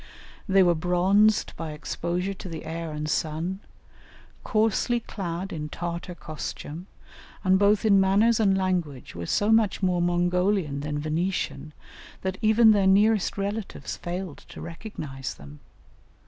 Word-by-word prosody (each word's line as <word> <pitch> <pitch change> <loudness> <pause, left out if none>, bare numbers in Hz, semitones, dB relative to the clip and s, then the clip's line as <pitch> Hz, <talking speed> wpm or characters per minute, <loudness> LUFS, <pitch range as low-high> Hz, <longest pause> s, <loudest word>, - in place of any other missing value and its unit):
They 190 0 +6
were 175 -1 +4
bronzed 185 +5 +2
by 160 -2 -5
exposure 175 +4 -3
to 185 -1 -9
the 160 -1 -7
air 165 0 -4
and 150 0 -4
sun, 160 +5 -2 0.8
coarsely 225 +2 +1
clad 190 -4 -5
in 150 -2 -4
Tartar 175 +2 -5
costume, 155 +2 -7 0.6
and 190 -1 +4
both 205 +2 +3
in 200 -2 +6
manners 205 +4 +4
and 195 -3 +3
language 175 -8 -2
were 85 0 -6
so 205 +2 +2
much 220 -3 +3
more 180 -1 +2
Mongolian 175 -2 +1
than 150 +1 -3
Venetian, 155 -1 -2 0.5
that 190 0 -3
even 220 0 +6
their 200 -2 +3
nearest 205 +1 +3
relatives 200 -6 -4
failed 175 -2 -5
to - - -10
recognize 155 - -6
them. 70 +1 -13
180 Hz, 135 wpm, -26 LUFS, 160-200 Hz, 0.8 s, They